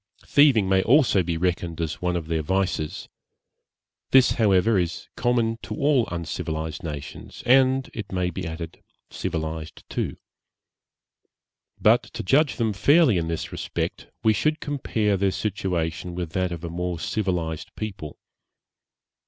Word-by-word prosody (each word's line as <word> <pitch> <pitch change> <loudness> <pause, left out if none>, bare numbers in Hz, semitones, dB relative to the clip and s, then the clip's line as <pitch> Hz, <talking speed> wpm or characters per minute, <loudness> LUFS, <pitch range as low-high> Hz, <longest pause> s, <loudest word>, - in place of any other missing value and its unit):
Thieving 140 -9 +5
may 95 0 +3
also 120 -4 +4
be 85 -1 -2
reckoned 85 -1 -1
as 80 -2 -3
one 90 0 0
of 85 -2 -2
their 80 0 -1
vices; 90 -2 -1 1.0
this, 130 -1 +6
however, 105 -1 +3
is 85 -1 -3
common 115 -2 +1
to - - -6
all 140 -5 +2
uncivilized 80 -2 -4
nations, 75 -3 -7
and, 130 +1 +4
it 110 - -6
may 90 -1 0
be 90 0 -5
added, 80 0 -7 0.3
civilized 80 -3 -5
too. - - -2 1.6
But - - +5
to - - -4
judge 140 +9 +3
them 110 -3 0
fairly 140 - +4
in 80 - -2
this 80 -1 -3
respect, - - -4 0.2
we 110 - +5
should 155 +9 0
compare 110 -8 0
their 100 +1 +2
situation 90 -4 -2
with 85 -3 -4
that 90 0 -1
of 85 -1 -6
a 85 - -4
more 90 0 -3
civilized 85 -6 -2
people. 95 -9 -6
95 Hz, 140 wpm, -24 LUFS, 85-115 Hz, 1.6 s, this